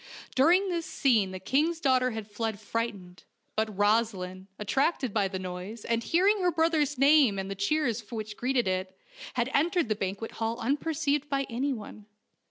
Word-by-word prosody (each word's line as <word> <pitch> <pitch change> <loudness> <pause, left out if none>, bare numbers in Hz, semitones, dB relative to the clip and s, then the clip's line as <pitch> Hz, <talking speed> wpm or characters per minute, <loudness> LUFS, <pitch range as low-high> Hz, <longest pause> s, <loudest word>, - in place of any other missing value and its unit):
During 350 +9 +4
this 340 -2 -2
scene 225 -8 +2
the 185 0 -6
king's 305 - +1
daughter 255 -4 +3
had 220 -3 -5
fled 220 0 -3
frightened; 205 -5 -4 0.3
but 220 +1 +1
Rosaleen, 200 -3 0
attracted 265 - 0
by 205 -3 +2
the 190 0 -4
noise, 185 +4 -6
and 230 0 0
hearing 390 - +3
her 360 - +3
brother's 320 -4 +1
name 275 -6 +5
and 195 0 -4
the - - 0
cheers 230 +1 -1
which 215 -2 -5
greeted 250 -2 0
it, 185 0 -2 0.4
had 245 +1 0
entered 335 -2 +2
the 215 - +1
banquet 200 +2 -4
hall 225 +1 -2
unperceived 290 +2 0
by 275 0 0
anyone. 230 -4 -4
230 Hz, 165 wpm, -28 LUFS, 205-290 Hz, 0.4 s, name